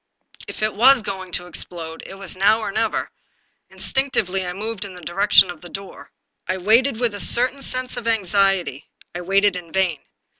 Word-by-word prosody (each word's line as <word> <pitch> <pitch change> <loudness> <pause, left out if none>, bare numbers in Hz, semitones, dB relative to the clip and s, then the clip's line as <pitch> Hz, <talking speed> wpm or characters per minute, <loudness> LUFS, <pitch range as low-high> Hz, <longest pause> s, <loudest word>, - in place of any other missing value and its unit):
If - - -7
it 215 -1 0
was 245 +3 +5
going 185 -3 -6
to 175 - -2
explode, 165 -1 -7
it - - -10
was 195 -2 -5
now 200 +4 +3
or 215 - -4
never. 220 +2 -2 0.6
Instinctively 195 -9 0
I - - -3
moved 210 +2 -4
in 195 -2 -9
the 180 - -11
direction 195 +1 +4
of 165 -3 -13
the 175 - -11
door. 195 +1 -9 0.4
I 185 - -1
waited 225 +6 +2
with 240 -3 +1
a 205 - -6
certain 255 +6 +4
sense 255 -1 -2
of 230 - -6
anxiety. 195 - 0 0.2
I 175 - -5
waited 195 +2 +2
in 175 -2 -8
vain. 185 -5 0
195 Hz, 185 wpm, -21 LUFS, 180-225 Hz, 0.6 s, was